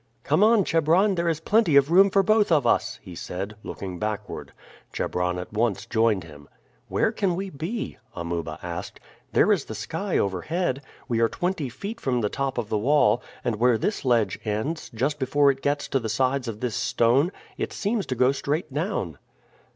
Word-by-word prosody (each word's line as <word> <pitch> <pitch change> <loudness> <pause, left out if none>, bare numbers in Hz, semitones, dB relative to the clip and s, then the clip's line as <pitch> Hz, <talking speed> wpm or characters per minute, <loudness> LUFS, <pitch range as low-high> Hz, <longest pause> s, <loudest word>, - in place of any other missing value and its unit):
"Come - - +3
on, 220 -1 +5
Chebron; 165 +5 +3
there 170 -2 0
is 160 -2 -1
plenty 195 -2 +3
of 140 +2 +5
room 195 +3 +7
for 195 0 +3
both 215 -1 +3
of 150 -4 +4
us," - - +1
he 90 - -10
said, 95 +4 -5
looking 95 -4 -6
backward. 105 -1 -4 0.4
Chebron 90 0 -1
at 90 +3 -7
once 110 -1 0
joined 110 -5 +2
him. 75 -3 -14 0.4
"Where - - +1
can 195 -5 0
we 190 +1 -4
be?" 165 +11 -4 0.2
Amuba 85 -2 -4
asked. 85 +2 -6 0.3
"There - - +4
is - - +2
the - - -7
sky - - -2
overhead. 135 - -1 0.3
We 115 -3 0
are 115 -1 +3
twenty 175 -6 -2
feet 210 - -7
from 125 -3 0
the 105 - 0
top 135 +1 -2
of 115 -3 -2
the 105 - 0
wall, 125 -2 +3 0.2
and 120 -3 -1
where 120 +1 +4
this 205 - -2
ledge 115 -7 +2
ends, 110 +10 -2
just 135 +5 -1
before 140 +1 +4
it 135 0 -8
gets 145 +1 0
to 135 - +1
the 115 -3 -4
sides 130 +3 0
of 110 -2 -5
this 125 -4 -2
stone, 130 +9 +2 0.3
it - - -2
seems 210 -1 -1
to 130 - -2
go 125 +2 +4
straight 145 +2 -2
down." 145 - -2
130 Hz, 190 wpm, -25 LUFS, 105-170 Hz, 0.4 s, room